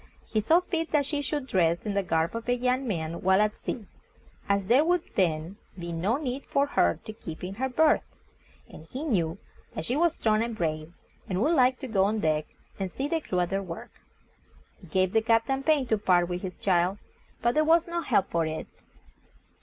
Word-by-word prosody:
He 215 - 0
thought 335 - +3
fit 330 -2 -2
that 290 -2 +3
she 290 0 -2
should 290 0 -2
dress 170 -7 +2
in 210 - -1
the 200 - +2
garb 165 +1 0
of 230 +1 -5
a 245 - +3
young 250 +2 0
man 165 -5 -3
while 190 +1 +4
at 210 0 +2
sea, 225 - -5 0.6
as 200 -1 +2
there 250 +9 +5
would 350 +1 +2
then 170 0 0 0.2
be 170 -1 -5
no 185 +9 0
need 275 -2 -4
for 280 - +1
her 85 - +2
to 215 - -6
keep 165 -7 -9
in 185 +1 -4
her 260 +6 -2
berth, 305 +4 +4 0.7
and 160 - -13
he 260 - -6
knew 180 - 0 0.4
that 160 - -4
she 245 - -1
was 340 +2 +2
strong 215 -1 +2
and 230 -1 -3
brave, 155 -1 -2 0.4
and 185 -1 -1
would 315 - +3
like 255 -3 +4
to 265 - -4
go 195 -5 +2
on 215 +2 0
deck, 155 -4 0 0.3
and 190 -2 -3
see 270 +8 -3
the 325 +1 -1
crew 180 -10 -1
at 175 +1 -1
their 195 0 0
work. 175 -3 -8 0.9
It 180 - -14
gave 185 +2 +1
the 220 - +4
Captain 230 +4 +2
pain 295 -2 +2
to 220 -3 +1
part 175 -3 +3
with 180 0 -3
his 185 -2 -5
child, 180 0 +1 0.5
but 240 +1 +3
there 310 - +3
was, 330 +1 +4
no 340 0 -2
help 210 - +1
for 165 -1 +1
it. 155 0 -4
210 Hz, 215 wpm, -27 LUFS, 175-265 Hz, 0.9 s, there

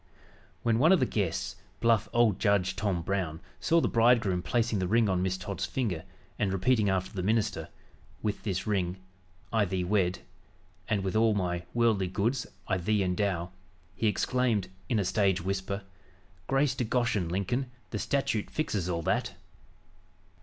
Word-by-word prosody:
When 115 -1 +2
one 160 +7 +6
of 190 - +6
the 130 - +3
guests, 95 -4 -2 0.2
bluff 115 -2 +3
old 120 -5 +3
Judge 100 -3 +2
Tom 100 -4 -1
Brown, 85 -4 -2 0.2
saw 170 - +3
the - - +1
bridegroom 115 -6 +3
placing 115 +2 0
the 90 - 0
ring 115 +3 +3
on 95 -2 +1
Miss 95 0 0
Todd's 95 0 -4
finger, 95 -11 -2 0.3
and 100 -2 +1
repeating 105 +2 +2
after 95 -1 -1
the 95 - -3
minister, 105 -5 0 0.5
"With 105 -1 -1
this 95 -2 -2
ring" 95 -3 0 0.6
"I 110 -2 +3
thee 95 -1 -1
wed" 90 -1 +1 0.7
"and 100 -3 0
with 95 +1 -2
all" 110 -1 +4
"my 90 -3 -1
worldly 110 -5 +3
goods" 115 +8 -1 0.2
"I 95 - +1
thee 105 +3 +1
endow" 90 -1 -1 0.4
he 115 - 0
exclaimed, 115 -1 +1 0.2
in 115 - +2
a 100 - +1
stage 95 -1 +2
whisper: 95 +2 -3 0.6
"Grace 135 0 +2
to 125 - 0
Goshen, 110 -7 0
Lincoln, 110 +9 -1 0.2
the 105 - -2
statute 125 -6 0
fixes 100 - -2
all 85 -1 -1
that!" - - 0
100 Hz, 160 wpm, -29 LUFS, 95-115 Hz, 0.7 s, one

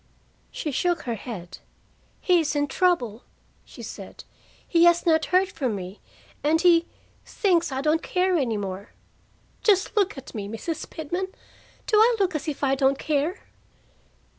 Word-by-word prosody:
She 300 - -4
shook 345 +4 0
her 240 - -2
head. 190 -5 -8 0.6
"He 360 -2 +4
is 310 -2 -1
in 290 0 +2
trouble," 280 - 0 0.4
she - - -12
said. - - -9 0.4
"He 335 -1 +4
has 345 +1 +4
not 320 -2 +3
heard 370 +1 +2
from 260 - -2
me, 185 +1 -7 0.4
and 310 +2 +3
he 340 -1 +4 0.4
thinks 345 - +1
I 265 0 -2
don't 310 +3 +2
care 365 0 +1
any 245 -9 0
more. 195 0 -6 0.7
Just 405 -1 +2
look 405 -5 +1
at 270 - -10
me, 205 -4 -5
Mrs. 295 +10 -5
Pitman! 350 +4 -3 0.6
Do 430 - +2
I 460 +3 +6
look 380 -2 +1
as 305 -1 -4
if 290 -2 -4
I 270 -1 +3
don't 270 0 +2
care?" 305 +5 -1
315 Hz, 160 wpm, -25 LUFS, 260-355 Hz, 0.7 s, I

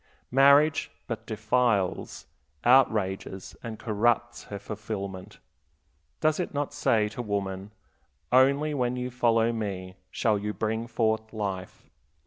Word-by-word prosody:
Marriage 140 +3 +5 0.2
but - - -6
defiles, 120 -7 0 0.4
outrages, 105 -7 +2
and 115 -2 -6
corrupts 120 +2 0
her 100 - -6
fulfillment. 100 -2 -6 0.8
Does 155 +1 +2
it 175 - -3
not 145 0 -2
say 110 -7 +2
to 115 +3 -6
woman, 100 -3 -3 0.6
Only 140 +4 +4
when 125 -3 0
you 125 0 -3
follow 115 -1 +2
me 95 -4 -4
shall 105 +1 +1
you 105 +1 -3
bring 110 +1 -2
forth 110 -1 0
life? 95 -4 -5
110 Hz, 115 wpm, -27 LUFS, 100-125 Hz, 0.8 s, Marriage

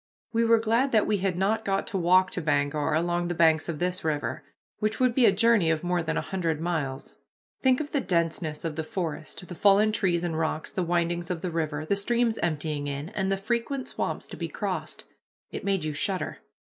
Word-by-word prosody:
We 230 +1 +3
were 230 0 +5
glad 230 +5 +1
that 215 -2 +4
we 210 - +1
had 185 -2 -1
not 215 +4 +1
got 195 0 0
to 195 - -3
walk 185 +2 +4
to 180 - -3
Bangor 145 0 +1
along 175 +1 0
the 175 - -2
banks 160 0 +3
of 165 - -2
this 180 +3 -1
river, 150 -2 -2 0.4
which 215 +1 -1
would 255 -2 +3
be 245 -1 +5
a - - +6
journey 210 -3 +3
of 160 0 0
more 175 0 +1
than 160 0 -2
a - - +1
hundred 165 -5 -2
miles. 155 -6 -3 0.5
Think 260 -1 +4
of 305 -1 -4
the 285 - +1
denseness 165 -4 -1
of 160 -2 -3
the 160 - -1
forest, 165 +1 -4
the - - -7
fallen 205 +4 +4
trees 180 -5 +1
and 165 -2 -2
rocks, 160 -1 -2
the 185 - -2
windings 175 0 0
of 175 -3 -3
the 180 - -3
river, 155 -2 -2
the 200 - +1
streams 230 +3 +1
emptying 150 -3 -1
in, 140 +3 -4
and 195 -2 -1
the 195 - +1
frequent 235 +6 -2
swamps - - -3
to - - -8
be - - -3
crossed. - - -4 0.5
It - - -5
made 195 -5 0
you 155 - -2
shudder. 185 +6 -2
175 Hz, 220 wpm, -27 LUFS, 160-205 Hz, 0.5 s, a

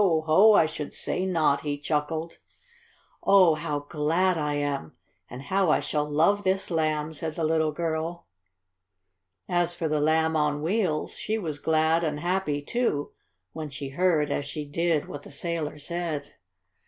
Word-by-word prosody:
Ho! 165 +4 +5
I 165 - +6
should 155 -2 -6
say 185 +1 -2
not!" 155 -6 +2
he 145 -1 -2
chuckled. 155 +3 -2 0.8
"Oh, 185 -4 +6
how 150 -2 -3
glad 165 +5 +1
I 150 -2 -1
am! 145 - -2 0.4
And 125 +2 -8
how 190 +1 +1
I - - +4
shall 150 -1 -2
love 170 +8 +3
this 190 0 0
Lamb!" 155 -1 0
said 155 0 -4
the 165 - -2
little 160 0 +2
girl. 165 +1 -3 1.2
As 175 -1 +1
for 165 -2 -2
the 150 -1 0
Lamb 160 +1 +2
on 150 -1 0
Wheels, 175 -4 -1
she 220 - -1
was 155 -8 -4
glad 160 +2 +2
and 150 -2 -1
happy, 175 -4 -1
too, 150 -7 -1 0.4
when 155 -2 -5
she 140 0 -6
heard, 155 -1 +1
as 145 - -1
she 150 +1 -5
did, 160 +1 0
what 145 - -7
the - - -13
sailor 155 0 -3
said. 155 -2 -4
160 Hz, 160 wpm, -26 LUFS, 150-170 Hz, 1.2 s, I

